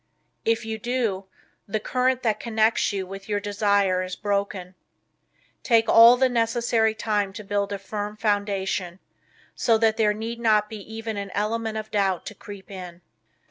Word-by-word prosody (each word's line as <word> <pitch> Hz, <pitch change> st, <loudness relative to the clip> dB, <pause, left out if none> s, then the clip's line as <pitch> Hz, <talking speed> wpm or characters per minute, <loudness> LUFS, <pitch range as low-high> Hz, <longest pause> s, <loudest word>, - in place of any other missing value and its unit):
If 225 Hz, 0 st, +1 dB
you 220 Hz, 0 st, -4 dB
do 230 Hz, -5 st, -1 dB, 0.4 s
the 215 Hz, +1 st, -1 dB
current 255 Hz, +3 st, 0 dB
that 215 Hz, -3 st, +1 dB
connects 225 Hz, -1 st, +1 dB
you 195 Hz, -2 st, -3 dB
with 195 Hz, +2 st, -10 dB
your 205 Hz, -1 st, 0 dB
desire 200 Hz, -2 st, +1 dB
is 185 Hz, 0 st, -4 dB
broken. 200 Hz, -3 st, -2 dB, 0.9 s
Take 230 Hz, -2 st, +3 dB
all 230 Hz, +2 st, +8 dB
the 260 Hz, +1 st, +4 dB
necessary 230 Hz, -2 st, +1 dB
time 210 Hz, -2 st, -1 dB
to 215 Hz, +1 st, -8 dB
build 200 Hz, 0 st, -1 dB
a 200 Hz, -, -2 dB
firm 205 Hz, +2 st, -5 dB
foundation, 200 Hz, -4 st, -1 dB, 0.6 s
so 225 Hz, -1 st, +2 dB
that 220 Hz, 0 st, +2 dB
there 210 Hz, -2 st, +2 dB
need 230 Hz, +2 st, -5 dB
not 215 Hz, -2 st, +2 dB
be 220 Hz, -, -5 dB
even 225 Hz, -1 st, -5 dB
an 200 Hz, -1 st, -4 dB
element 220 Hz, +1 st, -1 dB
of 215 Hz, 0 st, -6 dB
doubt 195 Hz, -4 st, 0 dB
to -, -, -6 dB
creep 200 Hz, -1 st, -11 dB
in. 180 Hz, -2 st, -9 dB
210 Hz, 165 wpm, -24 LUFS, 200-225 Hz, 0.9 s, all